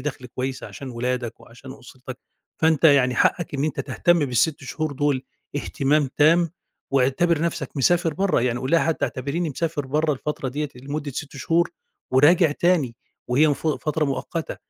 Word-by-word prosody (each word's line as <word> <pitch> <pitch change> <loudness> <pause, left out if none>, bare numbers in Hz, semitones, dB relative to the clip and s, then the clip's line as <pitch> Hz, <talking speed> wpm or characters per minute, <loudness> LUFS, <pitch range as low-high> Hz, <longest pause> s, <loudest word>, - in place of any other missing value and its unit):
دخْل 130 -2 -5
كويس 130 +2 -4
عشان 135 -2 -8
ولادك 125 0 -3
وعشان 130 +3 -12
أُسرتك، 130 -1 -11 0.4
فأنت 160 0 +2
يعني 135 -4 +5
حقك 165 +6 +1
إن 140 +1 0
أنت 155 -2 -2
تهتم 175 +6 +2
بال6 135 +3 0
شهور 155 +3 -3
دول 140 -1 0 0.3
اهتمام 145 0 +1
تام، 165 +3 +4 0.4
واعتبر 140 +5 +2
نفْسَك 170 -1 -2
مسافر 165 +3 +2
برّه، 195 -3 +1
يعني 125 -1 0
قُل 130 - -4
لها 170 - +5
حتى 165 -1 0
اعتبريني 145 +6 -3
مسافر 150 -1 -3
برَّه 150 +2 +1
الفترة 140 0 -4
ديّة 150 +3 -3
لمدة 140 +3 -5
6 145 +2 -6
شهور 170 +5 +1 0.4
وراجع 155 +5 +5
تاني، 150 -8 +1 0.3
وهي 130 +5 +4
المف 145 +2 -1
فترة 155 0 0
مؤقتة 145 +4 -3
145 Hz, 160 wpm, -23 LUFS, 130-160 Hz, 0.4 s, يعني